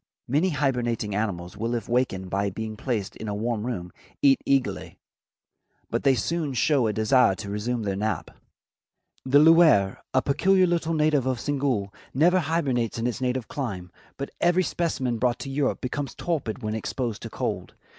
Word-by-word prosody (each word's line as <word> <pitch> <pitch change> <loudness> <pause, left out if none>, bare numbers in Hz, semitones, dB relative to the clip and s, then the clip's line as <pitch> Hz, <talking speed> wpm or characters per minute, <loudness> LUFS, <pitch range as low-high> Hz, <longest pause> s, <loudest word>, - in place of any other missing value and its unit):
Many 150 +9 +2
hibernating 120 - -1
animals 95 -4 -3
will 115 +3 -2
if 115 -3 -4
wakened 105 -7 -1
by 100 +1 0
being 110 +3 -5
placed 110 -4 -3
in 110 - -7
a 105 - -2
warm 115 +1 -2
room, 90 -8 -4 0.3
eat 135 -1 +5
eagerly, 135 -2 0 0.9
but - - 0
they 135 -2 +4
soon 150 +3 -2
show 135 -2 +3
a - - +1
desire 110 0 +3
to 100 +1 -7
resume 115 +3 -2
their 100 -2 -1
nap. 105 +2 -2 0.9
The 130 +2 +4
Loir, 155 - +5
a 130 - +2
peculiar 185 +6 +3
little 170 -2 0
native 150 -4 +2
of 130 -2 0
Senegal, 130 -8 -1 0.2
never 175 +6 +4
hibernates 140 -9 0
in 115 - -2
its 125 +1 -2
native 125 -2 -1
clime, 95 -11 -5 0.3
but 140 - -5
every 175 +2 +3
specimen 135 -9 -1
brought 125 0 +1
to 135 - -6
Europe 140 0 0
becomes 135 +1 -4
torpid 130 -8 -3
when 110 0 -2
exposed 115 0 -3
to - - -6
cold. - - -4
125 Hz, 170 wpm, -25 LUFS, 110-145 Hz, 0.9 s, eat